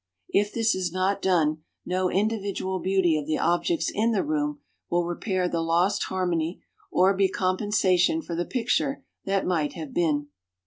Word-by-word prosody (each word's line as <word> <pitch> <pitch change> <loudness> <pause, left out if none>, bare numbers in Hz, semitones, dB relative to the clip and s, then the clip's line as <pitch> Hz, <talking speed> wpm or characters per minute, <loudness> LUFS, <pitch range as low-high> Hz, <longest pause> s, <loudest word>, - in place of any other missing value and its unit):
If 205 +1 +2
this 230 -1 +2
is 185 -2 -2
not 190 +2 0
done, 160 -5 +2 0.3
no 185 0 0
individual 195 -2 -1
beauty 185 -2 +2
of 150 - -7
the 155 - 0
objects 175 - +1
in 225 +2 +1
the 205 - +1
room 295 -1 -1 0.3
will 175 0 +1
repair 180 +1 -1
the 170 -1 -1
lost 175 +5 +1
harmony 175 -2 -2 0.3
or 190 +2 +4
be 195 0 +3
compensation 190 - +1
for 170 - -6
the 175 - 0
picture 265 +5 -1 0.2
that 195 0 0
might 160 -5 0
have 160 -5 -7
been. 150 -4 0
185 Hz, 165 wpm, -26 LUFS, 175-205 Hz, 0.3 s, or